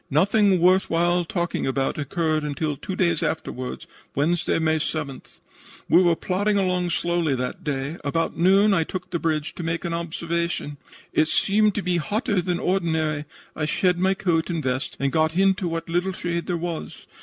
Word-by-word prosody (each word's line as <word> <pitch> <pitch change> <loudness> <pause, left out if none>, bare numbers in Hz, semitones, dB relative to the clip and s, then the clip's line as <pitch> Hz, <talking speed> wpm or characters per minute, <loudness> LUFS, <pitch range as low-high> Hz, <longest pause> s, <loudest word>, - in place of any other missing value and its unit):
Nothing 195 +5 +3
worth 185 +2 +4
while 175 +1 +2
talking 175 -2 -2
about 135 +2 -1
occurred 155 +1 0
until 150 0 -2
two 190 +6 -6
days 170 -4 +1
afterward 130 -5 -3 0.3
Wednesday, 160 +5 +1
May 160 -1 +2
7th. 150 -3 -5 0.5
"We 180 - +6
were 170 -2 +4
plodding 205 +4 0
along 180 -2 +1
slowly 170 -4 0
that 125 0 -4
day. 140 +2 -3
About 165 +3 -1
noon 195 +5 +4
I 165 -4 +3
took 185 +3 -6
the 170 - -1
bridge 155 -2 -1
to - - -7
make 165 0 -2
an 170 - -2
observation. 170 -2 -2 0.4
It 155 - +3
seemed 210 +4 +2
to 205 - -1
be 180 -1 +1
hotter 205 +3 0
than 175 0 -1
ordinary. 160 -5 0 0.3
I 155 -1 -1
shed 180 +2 +1
my 190 +1 +2
coat 170 -4 0
and 165 -3 -2
vest 130 0 -2
and 140 0 0
got 160 +2 +1
into 190 -1 +3
what 165 0 -3
little 175 +3 0
shade 170 -1 -3
there 175 - 0
was. 170 -1 -5
170 Hz, 180 wpm, -24 LUFS, 155-185 Hz, 0.5 s, We